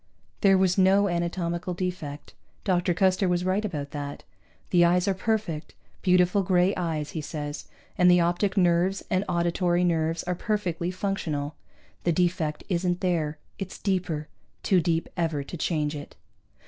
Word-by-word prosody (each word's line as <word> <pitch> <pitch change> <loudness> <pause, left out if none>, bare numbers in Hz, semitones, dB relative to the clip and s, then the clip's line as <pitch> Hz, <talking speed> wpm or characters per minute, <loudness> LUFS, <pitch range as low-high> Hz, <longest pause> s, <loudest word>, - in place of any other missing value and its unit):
There 195 -1 +6
was 185 0 +2
no 195 +2 +5
anatomical 175 0 -2
defect 170 -6 -5 0.3
Dr. 180 -2 +1
Custer 185 0 +2
was 180 0 0
right 190 +3 +1
about 150 -9 -4
that. 145 -1 -6 0.5
The 175 -1 +5
eyes 175 +2 +3
are 195 - +3
perfect, 190 -5 -2 0.3
beautiful 180 +1 +4
gray 180 +1 +3
eyes, 160 -4 -2
he 160 - -4
says, 145 -1 -5 0.3
and 180 0 +6
the 180 0 +6
optic 175 +4 +1
nerves 180 +1 +2
and 185 +1 +2
auditory 175 0 +1
nerves 165 -1 +1
are 180 - -1
perfectly 175 -3 -2
functional. 175 -6 -2 0.5
The 170 - +2
defect 170 -3 0
isn't 175 -1 0
there. 165 -5 0 0.2
It's 195 -2 -5
deeper. 180 -6 -1 0.4
Too 185 -3 +3
deep 165 0 0
ever 165 -4 -1
to 140 - -8
change 155 -2 -1
it. 145 -1 -8
175 Hz, 150 wpm, -26 LUFS, 165-185 Hz, 0.5 s, There